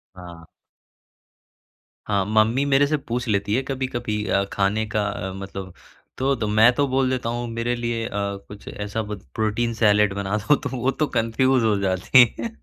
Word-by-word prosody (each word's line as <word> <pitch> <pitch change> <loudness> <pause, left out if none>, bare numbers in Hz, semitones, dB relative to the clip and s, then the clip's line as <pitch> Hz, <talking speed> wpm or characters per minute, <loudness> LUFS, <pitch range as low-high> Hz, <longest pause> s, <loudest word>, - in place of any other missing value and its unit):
हाँ। 85 -2 -11 1.6
हाँ, 100 -2 +1
मम्मी 110 +5 +2
मेरे 140 0 +4
से 150 - +1
पूछ 125 -3 -4
लेती 100 -1 0
है 130 - +1
कभी-कभी 125 -5 -3
अ, 100 - +2
खाने 105 +2 +1
का 105 -2 -2
मतलब 95 -1 -7 0.4
तो 135 +1 +1
तो 115 -4 -3
मैं 110 +3 +5
तो 140 +3 +1
बोल 130 0 +1
देता 125 -3 -2
हूँ 120 +1 -3
मेरे 115 +1 -2
लिए 120 -1 -2
अ, - - -4 0.4
कुछ 105 -1 -12
ऐसा 105 +2 -4
ब 105 -1 -6 0.2
प्रोटीन 110 +2 0
सैलेड 105 -2 +3
बना 100 +1 -2
दो 115 +8 +3
तो 140 - -5
वो 125 +2 +1
तो 155 - +2
कन्फ्यूज 120 +3 +2
हो 110 -2 +2
जाती 95 +6 +5 0.2
हैं। 230 - -3
110 Hz, 175 wpm, -23 LUFS, 105-125 Hz, 1.6 s, मैं